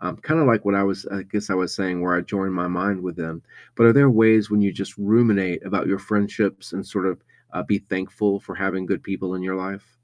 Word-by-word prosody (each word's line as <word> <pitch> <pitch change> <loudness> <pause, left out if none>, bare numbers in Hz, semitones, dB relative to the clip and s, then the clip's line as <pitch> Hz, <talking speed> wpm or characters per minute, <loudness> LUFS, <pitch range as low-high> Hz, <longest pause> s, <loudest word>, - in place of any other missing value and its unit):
Um, - - -5
kinda 155 0 +2
like 115 -5 +4
what 100 0 +2
I 100 - +3
was 100 0 -1
I 100 -1 -5
guess 105 +1 -4
I - - +1
was 95 -2 -1
saying 90 -2 -2
where 90 0 +1
I - - +2
join 95 0 -3
my 90 -1 -2
mind 95 +2 -1
with 90 -2 -6
them. 80 -1 -7 0.3
But 115 - +5
are 115 - +9
there 140 +1 +7
ways 110 -2 +5
when 105 0 +3
you 100 -1 +1
just 100 +3 -7
ruminate 100 -4 +2
about - - -1
your 95 - +1
friendships 100 -1 -1
and 95 - -6
sort 95 -2 -2
of, 90 - -3 0.3
uh, - - -4
be 100 -1 0
thankful 100 +1 -2
for - - -10
having 95 -1 -2
good - - -2
people 95 -1 -5
in 90 - -5
your 95 0 -3
life? 100 +4 -7
100 Hz, 250 wpm, -22 LUFS, 95-105 Hz, 0.3 s, are